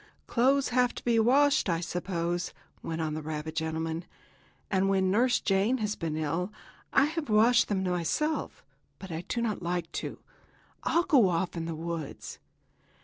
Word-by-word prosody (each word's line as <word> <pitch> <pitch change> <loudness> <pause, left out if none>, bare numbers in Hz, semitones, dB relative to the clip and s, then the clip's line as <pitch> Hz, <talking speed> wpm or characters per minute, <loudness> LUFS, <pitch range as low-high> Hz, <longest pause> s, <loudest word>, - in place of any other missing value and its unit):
Clothes 270 +3 +2
have 250 0 +2
to - - -8
be 235 -2 +3
washed, 280 +2 +4
I 165 -1 +1
suppose," 175 0 -2 0.3
went 165 0 -3
on 155 -1 -1
the 155 - -3
rabbit 155 0 -5
gentleman, 160 +1 -2 0.7
"and 195 0 +2
when 190 -1 +2
Nurse 245 +4 +3
Jane 200 +6 +2
has 210 -3 -2
been 160 -2 -3
ill 165 +5 -1 0.4
I 275 - +5
have 315 -2 -3
washed 225 +3 +5
them 195 -2 0
myself, 185 - -1 0.3
but 190 -2 -9
I 160 0 -3
do 235 - -1
not 215 -4 -2
like 175 -1 -3
it. - - -5 0.6
I'll 340 - +2
go 275 - +5
off 175 +1 -1
in 165 -1 -3
the 165 -1 -4
woods." 165 -2 -6
190 Hz, 165 wpm, -29 LUFS, 165-240 Hz, 0.7 s, I